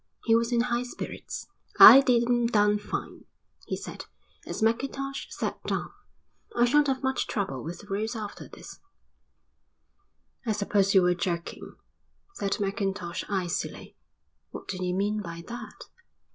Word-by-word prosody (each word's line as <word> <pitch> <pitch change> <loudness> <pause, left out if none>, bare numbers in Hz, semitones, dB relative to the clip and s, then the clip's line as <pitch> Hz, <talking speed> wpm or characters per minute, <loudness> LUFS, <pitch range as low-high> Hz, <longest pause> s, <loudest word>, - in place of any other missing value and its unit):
He 225 - +3
was 230 +1 +2
in 235 -1 +3
high 240 0 0
spirits. 245 - -7 0.3
"I 270 - +12
did 245 -3 +3
'em 240 -1 +2
down 210 -2 +3
fine," 205 - -6 0.4
he - - -2
said, - - -8 0.4
as - - -3
Mackintosh 275 +4 -1
sat - - -4
down. - - -2 0.6
"I 240 - +4
shan't 295 +4 +4
have 265 -1 -1
much 265 0 0
trouble 190 - -3
with 170 +2 -7
the 205 - -16
roads 215 +4 -2
after 210 -2 -7
this." - - -12 1.6
"I 225 -4 0
suppose 200 -1 +1
you 190 - +7
were 180 0 +4
joking," 170 -1 -4 0.6
said 200 - -2
Mackintosh 195 -3 -2
icily. 185 -4 -3 0.5
"What - - -9
do 185 -1 -4
you 180 0 -1
mean 205 +2 0
by 170 -3 -7
that?" 235 -3 -8
210 Hz, 145 wpm, -27 LUFS, 195-240 Hz, 1.6 s, I